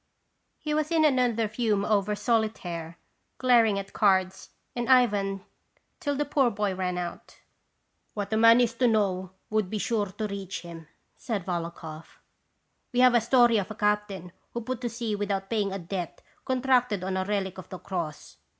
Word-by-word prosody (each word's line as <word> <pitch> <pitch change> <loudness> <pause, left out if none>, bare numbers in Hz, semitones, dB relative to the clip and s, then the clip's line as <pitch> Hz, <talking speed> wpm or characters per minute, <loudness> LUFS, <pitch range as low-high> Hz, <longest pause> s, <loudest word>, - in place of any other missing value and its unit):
He 300 - -3
was 305 0 0
in 325 -2 +3
another 245 -6 +2
fume 215 -2 0
over 210 -1 +1
solitaire, 185 -8 -2 0.4
glar 245 -3 +5
ing 200 - 0
at 195 0 -6
cards 190 -2 +1 0.3
and 240 -1 -2
Ivan 205 -6 +3 0.5
till 285 -1 -1
the 295 +1 0
poor 275 -3 +2
boy 205 -2 -1
ran 180 -1 -2
out. 175 -1 -6 0.4
" - - -47
What 205 0 -3
a - - +3
man 230 +1 +7
is 235 -1 +1
to 245 +2 +2
know 195 -5 +1 0.2
would 215 -3 +1
be 215 - -2
sure 210 -1 0
to 205 +3 -5
reach 200 -1 -5
him," 165 -2 -10 0.3
said 210 -8 -4
Volokhoff. 165 -3 -6 0.7
"We 250 0 +2
have 255 -1 +6
a 240 - +4
story 240 -1 +4
of 195 - -4
a 215 - -6
captain 210 -4 -1 0.2
who 235 - -2
put 255 +1 -4
to 240 - -2
sea 230 -2 -3
without 200 -1 -3
pay 220 -2 +2
ing 200 -1 -1
a 195 - -3
debt 175 -1 -5 0.2
contracted 250 -6 +1
on 190 0 -2
a 190 - 0
relic 190 -2 -2
of 185 - -11
the 185 - -6
cross. 170 -5 -6
210 Hz, 185 wpm, -27 LUFS, 190-235 Hz, 0.7 s, man